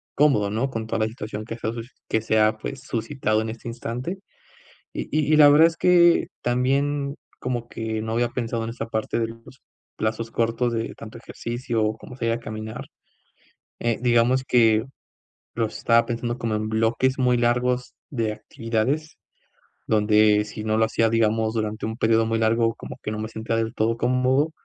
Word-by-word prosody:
cómodo, 135 Hz, -9 st, +3 dB
¿no?, 115 Hz, +6 st, 0 dB
con 115 Hz, -4 st, -4 dB
toda 110 Hz, -, -1 dB
la 110 Hz, -, +2 dB
situación 110 Hz, -1 st, -6 dB
que 115 Hz, -, -6 dB
se 115 Hz, -, -4 dB
ha 110 Hz, -, -1 dB
suci 115 Hz, +1 st, -7 dB, 0.2 s
que 110 Hz, -, +1 dB
se 110 Hz, 0 st, +1 dB
ha, 110 Hz, +1 st, +3 dB
pues, 130 Hz, +4 st, -6 dB
suscitado 115 Hz, -2 st, -1 dB
en 110 Hz, -, -3 dB
este 115 Hz, +1 st, -8 dB
instante. 120 Hz, +9 st, -4 dB, 0.7 s
Y -, -, -5 dB
y 155 Hz, 0 st, +1 dB
y -, -, +5 dB
la 150 Hz, -1 st, +9 dB
verdad 155 Hz, +3 st, +7 dB
es 165 Hz, -, -8 dB
que 175 Hz, -1 st, +5 dB, 0.2 s
también 140 Hz, +3 st, 0 dB, 0.3 s
como 120 Hz, -2 st, -3 dB
que 110 Hz, -1 st, -3 dB
no 110 Hz, 0 st, -3 dB
había 120 Hz, +1 st, +1 dB
pensado 115 Hz, -2 st, -2 dB
en 115 Hz, -, -4 dB
esa 115 Hz, -1 st, -5 dB
parte 110 Hz, 0 st, -2 dB
de 115 Hz, -, +1 dB
los 115 Hz, +3 st, -13 dB, 0.4 s
plazos 110 Hz, +1 st, -2 dB
cortos 115 Hz, +1 st, 0 dB
de 115 Hz, 0 st, -3 dB
tanto 115 Hz, +1 st, -10 dB
ejercicio, 120 Hz, -1 st, -3 dB
o 110 Hz, +1 st, -1 dB
como 125 Hz, -, -11 dB
sería 115 Hz, -2 st, -1 dB
caminar, 110 Hz, -1 st, -6 dB, 0.9 s
eh, 115 Hz, -1 st, 0 dB
digamos 125 Hz, +2 st, +3 dB
que 115 Hz, -3 st, +4 dB, 0.7 s
lo 115 Hz, -1 st, +1 dB
estaba 115 Hz, +2 st, +2 dB
pensando 120 Hz, 0 st, -3 dB
como 115 Hz, -2 st, -2 dB
en 110 Hz, 0 st, -2 dB
bloques 115 Hz, +4 st, +1 dB
muy 125 Hz, -1 st, +3 dB
largos 125 Hz, +1 st, 0 dB, 0.2 s
de 115 Hz, -6 st, -1 dB
actividades, 115 Hz, +6 st, -2 dB, 0.7 s
donde 105 Hz, -1 st, +4 dB
si 105 Hz, 0 st, -7 dB
no 110 Hz, 0 st, +1 dB
lo 110 Hz, -, +4 dB
hacía, 115 Hz, 0 st, +2 dB
digamos, 110 Hz, 0 st, +1 dB
durante 110 Hz, -1 st, -2 dB
un 110 Hz, 0 st, -4 dB
período 115 Hz, 0 st, +3 dB
muy 115 Hz, 0 st, 0 dB
largo, 115 Hz, 0 st, +2 dB
como -, -, -9 dB
que -, -, -3 dB
no 105 Hz, -, -4 dB
me 110 Hz, -, -4 dB
sentía 115 Hz, +1 st, -3 dB
del 115 Hz, 0 st, -1 dB
todo 115 Hz, +1 st, +1 dB
cómodo. 130 Hz, +5 st, +2 dB
115 Hz, 185 wpm, -24 LUFS, 110-125 Hz, 0.9 s, la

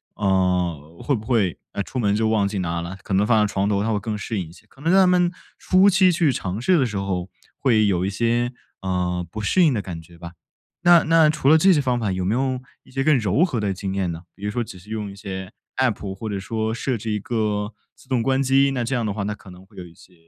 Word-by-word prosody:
呃， 90 Hz, -5 st, 0 dB
会 145 Hz, -, +1 dB
不 110 Hz, -2 st, -7 dB
会， 110 Hz, -9 st, +1 dB, 0.2 s
呃， 100 Hz, -, -2 dB
出 125 Hz, -, -5 dB
门 100 Hz, -3 st, +2 dB
就 110 Hz, +1 st, +1 dB
忘 105 Hz, -3 st, +2 dB
记 100 Hz, -, -4 dB
拿 85 Hz, -2 st, -2 dB
了， 90 Hz, +3 st, -6 dB
可 -, -, -4 dB
能 100 Hz, +2 st, +3 dB
放 110 Hz, -1 st, +4 dB
在 105 Hz, -, -3 dB
床 100 Hz, +1 st, +1 dB
头 100 Hz, -1 st, +1 dB
他 110 Hz, -, -1 dB
会 105 Hz, -, 0 dB
更 105 Hz, +1 st, -4 dB
适 105 Hz, +1 st, -3 dB
应 85 Hz, -4 st, -5 dB
一 -, -, -14 dB
些。 85 Hz, -, -18 dB
可 135 Hz, -, -20 dB
能 165 Hz, +3 st, +1 dB
他 190 Hz, 0 st, +6 dB
们 180 Hz, -1 st, +3 dB, 0.3 s
初 190 Hz, +2 st, +4 dB
期 185 Hz, 0 st, +5 dB
去 160 Hz, -4 st, +2 dB
尝 95 Hz, -3 st, -3 dB
试 180 Hz, +7 st, +3 dB
的 130 Hz, -, +3 dB
时 105 Hz, -3 st, -4 dB
候， 95 Hz, -2 st, -2 dB, 0.3 s
会 110 Hz, -6 st, +3 dB
有 90 Hz, -2 st, +1 dB
一 -, -, 0 dB
些， 120 Hz, +4 st, 0 dB, 0.3 s
呃， 90 Hz, -1 st, -1 dB
不 110 Hz, -, -6 dB
适 180 Hz, -, +2 dB
应 160 Hz, -, +5 dB
的 110 Hz, -, -1 dB
感 85 Hz, -4 st, -7 dB
觉 85 Hz, +1 st, -17 dB
吧。 85 Hz, 0 st, -9 dB, 0.5 s
那 175 Hz, -1 st, +7 dB
那 160 Hz, -1 st, +5 dB
除 150 Hz, -3 st, -1 dB
了 160 Hz, -, +7 dB
这 190 Hz, +5 st, +5 dB
些 150 Hz, -, +2 dB
方 125 Hz, -2 st, 0 dB
法 105 Hz, -4 st, -1 dB
有 95 Hz, 0 st, -2 dB
没 100 Hz, -, +1 dB
有 130 Hz, +1 st, 0 dB, 0.2 s
一 -, -, -21 dB
些 135 Hz, +1 st, -1 dB
更 155 Hz, 0 st, +4 dB
柔 110 Hz, -, +2 dB
和 130 Hz, -11 st, -2 dB
的 105 Hz, -2 st, -1 dB
经 95 Hz, 0 st, -4 dB
验 95 Hz, -3 st, -1 dB
呢？ 85 Hz, +2 st, -7 dB
比 100 Hz, -, -15 dB
如 105 Hz, -, -1 dB
说 120 Hz, +3 st, -1 dB
只 95 Hz, -4 st, -11 dB
是 105 Hz, -, -17 dB
用 105 Hz, -2 st, -4 dB
一 -, -, -11 dB
些 95 Hz, -1 st, -7 dB, 0.3 s
App 105 Hz, -6 st, 0 dB
或 110 Hz, +3 st, -6 dB
者 100 Hz, -, -3 dB
说 110 Hz, +2 st, -2 dB
设 125 Hz, +1 st, -2 dB
置 110 Hz, +1 st, -4 dB
一 105 Hz, -, -1 dB
个 105 Hz, -1 st, -2 dB, 0.2 s
自 -, -, -21 dB
动 125 Hz, -3 st, +1 dB
关 135 Hz, 0 st, +1 dB
机， 135 Hz, +1 st, +3 dB
那 125 Hz, -3 st, -1 dB
这 130 Hz, +3 st, -1 dB
样 120 Hz, -3 st, -1 dB
的 105 Hz, -, -1 dB
话 105 Hz, -, -4 dB
那 105 Hz, +1 st, -3 dB
可 100 Hz, -, -16 dB
能 90 Hz, +1 st, -14 dB
会 -, -, -24 dB
有 90 Hz, -, -6 dB
一 85 Hz, -, -15 dB
些， 90 Hz, -, -20 dB
105 Hz, 305 characters per minute, -22 LUFS, 95-130 Hz, 0.5 s, 那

